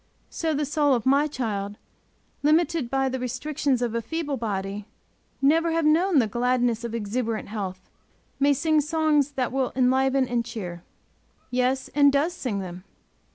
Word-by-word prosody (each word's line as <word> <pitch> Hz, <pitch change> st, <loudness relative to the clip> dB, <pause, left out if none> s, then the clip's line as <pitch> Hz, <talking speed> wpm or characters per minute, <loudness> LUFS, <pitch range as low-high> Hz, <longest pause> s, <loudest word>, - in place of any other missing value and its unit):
So 320 Hz, -2 st, -1 dB
the 295 Hz, +1 st, 0 dB
soul 290 Hz, -1 st, +2 dB
of 235 Hz, -, -3 dB
my 280 Hz, +3 st, +4 dB
child, 210 Hz, -7 st, -3 dB, 0.6 s
limited 310 Hz, -2 st, +2 dB
by 270 Hz, +1 st, +1 dB
the 260 Hz, 0 st, -2 dB
restrictions 255 Hz, +1 st, -1 dB
of 235 Hz, -2 st, -1 dB
a 230 Hz, -, -1 dB
feeble 300 Hz, +3 st, -3 dB
body, 200 Hz, -3 st, -4 dB, 0.6 s
never 325 Hz, +4 st, +3 dB
having 315 Hz, -2 st, +4 dB
known 355 Hz, +1 st, +2 dB
the 250 Hz, -, +5 dB
gladness 240 Hz, +1 st, 0 dB
of 235 Hz, -1 st, -4 dB
exuberant 225 Hz, 0 st, -2 dB
health, 190 Hz, -3 st, -5 dB, 0.5 s
may 285 Hz, +1 st, +4 dB
sing 310 Hz, +2 st, +2 dB
songs 300 Hz, -2 st, +1 dB
that 255 Hz, -3 st, -1 dB
will 265 Hz, -1 st, 0 dB
enliven 265 Hz, +1 st, +2 dB
and 240 Hz, -1 st, 0 dB
cheer. 190 Hz, -7 st, -6 dB, 0.7 s
Yes, 255 Hz, +1 st, 0 dB
and 285 Hz, -1 st, +4 dB
does 290 Hz, +5 st, +1 dB
sing 250 Hz, -, -3 dB
them! 180 Hz, -1 st, -8 dB
260 Hz, 155 wpm, -25 LUFS, 230-295 Hz, 0.7 s, the